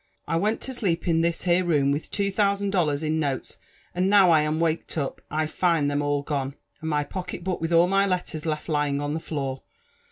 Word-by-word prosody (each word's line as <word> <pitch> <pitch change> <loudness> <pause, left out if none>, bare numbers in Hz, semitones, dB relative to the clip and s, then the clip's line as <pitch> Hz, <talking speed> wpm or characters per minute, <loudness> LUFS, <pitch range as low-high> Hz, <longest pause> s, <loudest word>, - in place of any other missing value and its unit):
I - - 0
wenl 210 +7 +1
to 265 - -4
sleep 185 -8 -1
m 165 -1 +3
this 170 0 0
here 175 0 +3
room 145 -5 +2
^vith 145 - -4
two 200 -1 0
thousand 200 0 +1
dollars 160 -6 +1
iQ 155 - 0
notes; 145 -4 -2 0.4
and 185 +2 +1
now 200 -3 +6
lam^ 155 -1 +3
waked 165 0 -1
up> 140 -3 -3
I 155 +1 0
find 155 -2 +1
them 145 0 0
all 145 0 0
gone, 140 -2 -3 0.3
and 160 - -3
my 150 -1 +1
pockelit 180 +2 -6
book 185 -2 -2
with 165 +1 -2
all 170 +1 +6
my 195 +2 +2
letters 175 -4 -2
left 150 -1 -2
lying 145 -3 0
en 145 0 -2
the 160 - -2
floor. 135 -4 -4
160 Hz, 220 wpm, -25 LUFS, 145-180 Hz, 0.4 s, now